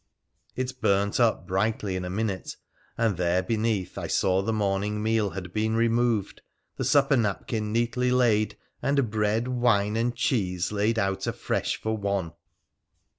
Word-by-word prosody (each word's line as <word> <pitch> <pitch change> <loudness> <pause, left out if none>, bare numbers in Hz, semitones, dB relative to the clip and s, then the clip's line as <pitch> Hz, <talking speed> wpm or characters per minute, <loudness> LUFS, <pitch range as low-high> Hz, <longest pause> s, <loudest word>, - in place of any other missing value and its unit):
It 130 0 -4
burnt 100 +2 +2
up 115 -6 +2
brightly 95 +1 -1
in 90 - -3
a 90 - -4
minute 100 -1 -3 0.2
— - - -35
and 110 -6 +1
there 90 +1 +1
beneath 110 -2 -1
I - - -4
saw 95 0 +2
the 100 - -1
morning 105 0 -1
meal 110 -2 +1
had 90 -2 -7
been 110 +1 0
removed, 115 -2 +1 0.4
the - - -2
supper 140 -1 +4
napkin 105 -1 -1
neatly 120 +2 +1
laid, 110 -5 +2 0.2
and 140 -5 +1
bread, 110 +2 +1
wine, 115 -5 +2
and 120 +2 0
cheese 95 -9 0
laid 105 +2 +1
out 95 -2 -1
afresh - - -2
for 110 0 -1
one 100 -5 -2
110 Hz, 155 wpm, -26 LUFS, 100-115 Hz, 0.4 s, supper